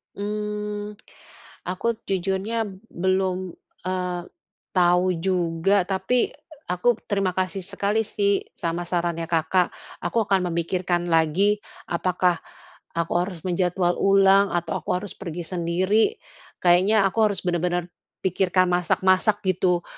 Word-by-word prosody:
Mmm, 210 0 -4 0.8
aku 185 +5 -2 0.2
jujurnya 195 +4 -1 0.2
belum, 185 0 0 0.3
eee, 180 -1 -2 0.5
tahu 180 0 +4
juga. 180 +1 +1
Tapi, 220 +6 +1 0.4
a 180 - -1
aku 230 +5 +2
terima 195 -2 +1
kasih 185 0 -1
sekali 200 +3 0
sih 200 -2 0
sama 170 +1 -2
sarannya 170 -2 -1
Kakak. 170 +2 +1 0.3
Aku 220 +6 +1
akan 185 -3 +1
memikirkan 175 +1 -1
lagi 175 +6 +3 0.3
apakah 180 0 +1 0.6
aku 170 0 -1
harus 180 -3 -5
menjadwal 180 0 +1
ulang 195 0 +5
atau 170 -2 -1
aku - - -8
harus 200 +1 -7
pergi 175 -3 -6
sendiri. 185 - +1 0.5
Kayaknya 185 +4 +5
aku 195 - -7
harus 200 -4 -3
bener-bener 175 0 0 0.4
pikirkan 185 0 +2
masak-masak 185 +4 +2
gitu, 180 -1 +2
185 Hz, 115 wpm, -24 LUFS, 175-200 Hz, 0.8 s, ulang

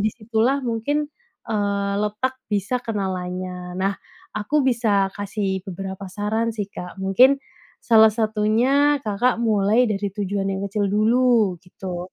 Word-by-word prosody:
di 210 - +2
situ 220 -1 -3
lah 265 +3 +2
mungkin, 285 +6 -1 0.4
eee, 200 -2 -1
letak 210 +5 -1 0.2
bisa 205 +4 0
kenalannya. 180 -3 -4
Nah, 195 +1 +1 0.4
aku 255 +9 +1
bisa 225 -6 +2
kasih 200 -2 -3
beberapa 190 +1 -6
saran 220 +3 -1
sih, 205 -3 -4
Kak, 180 +2 -8
mungkin 250 +9 +4 0.4
salah 220 -2 +6
satunya 235 +7 +2
Kakak 230 +2 0
mulai 220 +1 +3
dari 200 -2 -2
tujuan 200 -1 -2
yang 190 - -3
kecil 205 +1 -1
dulu, 220 -1 +3
gitu. 180 0 -7
210 Hz, 135 wpm, -22 LUFS, 195-230 Hz, 0.4 s, salah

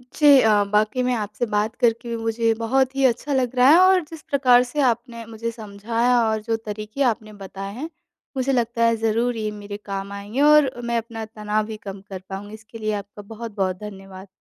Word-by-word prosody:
जी, 300 - +3
अ, 220 - +4 0.2
वाक़ई 215 +4 +2
मैं 250 - +1
आपसे 215 +2 -3
बात 210 +2 0
करके 235 0 +1
मुझे 225 0 0
बहुत 260 +3 +1
ही 275 - 0
अच्छा 260 +3 +1
लग 255 -1 0
रहा 250 +1 +5
है 320 - +8
और 370 0 +5
जिस 325 -2 -10
प्रकार 250 -3 +5
से 300 - 0
आपने 235 0 -3
मुझे 230 +1 -5
समझाया 230 +3 0
और 220 0 -1
जो 225 +1 -1
तरीक़े 215 +4 -6
आपने 215 -1 -9
बताए 195 +1 -7
हैं, 300 +7 -5 0.5
मुझे 260 +1 0
लगता 235 -1 0
है 230 0 +3
ज़रूर 225 +2 0
ये 215 -1 -2
मेरे 205 -1 -7
काम 195 0 -5
आएँगे 205 +6 -4
और 295 -2 +6
मैं 235 0 0
अपना 225 -1 -5
तनाव 215 -1 -2
भी 220 0 -7
कम 195 0 -6
कर 190 -1 -6
पाऊँगी 200 +2 -7
इसके 220 +1 -11
लिए 215 -1 -2
आपका 205 0 -7
बहुत-बहुत 200 -5 -3
धन्यवाद। 195 -2 -10
225 Hz, 200 wpm, -22 LUFS, 210-245 Hz, 0.5 s, है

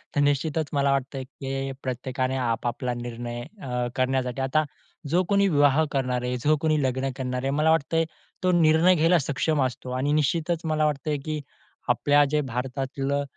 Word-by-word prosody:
तर 145 - +3
निश्चितच 145 +2 +1
मला 140 -1 +2
वाटतंय, 135 0 -2
की 135 0 -5
प्रत्येकाने 130 +1 -2
आपापला 120 0 -1
निर्णय 120 0 -5 0.2
अ, 125 -4 -2
करण्यासाठी 130 0 0
आता 135 +4 +2 0.5
जो 175 +4 +3
कोणी 200 0 +4
विवाह 145 -2 +4
करणार 125 -2 0
आहे 125 0 -1
जो 155 +1 +4
कोणी 155 -2 +2
लग्न 130 +1 0
करणार 125 -1 -3
आहे, 135 - 0
मला 150 +3 +2
वाटतं 165 +1 +2 0.4
तो 185 - +3
निर्णय 160 +3 +5
घ्यायला 165 +2 +4
सक्षम 145 +2 0
असतो 125 0 -5
आणि 140 +3 0
निश्चितच 160 +3 +1
मला 155 -1 +1
वाटतं 150 0 -1
आहे, 150 - +1
की 155 +1 -4 0.5
आपल्या 145 0 +4
जे 150 - +3
भारतातलं 135 +2 -2
140 Hz, 165 wpm, -25 LUFS, 130-155 Hz, 0.5 s, निर्णय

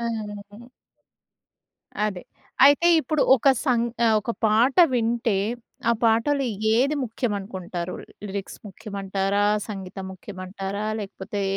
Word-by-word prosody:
హుహు. 215 0 -6 1.4
అది. 190 -4 -3 0.4
అయితే 285 +5 +6
ఇప్పుడు 305 +1 -1
ఒక 270 +2 +3 0.2
సంగ 240 -3 +2 0.2
ఆహ్, 220 - +4
ఒక 220 +3 -3
పాట 225 +5 +3 0.2
వింటే 230 -3 +1 0.5
ఆ - - +6
పాటలు 235 +5 +2 0.3
ఏది 270 +6 +2
ముఖ్యమనుకుంటారు 195 -6 -4 0.3
లిరిక్స్ 200 -1 -6
ముఖ్యమంటారా? 195 0 -2 0.2
సంగీతం 195 -2 -7
ముఖ్యమంటారా? 195 +2 -6
లేకపోతే 200 0 -5
210 Hz, 100 wpm, -24 LUFS, 195-235 Hz, 1.4 s, అయితే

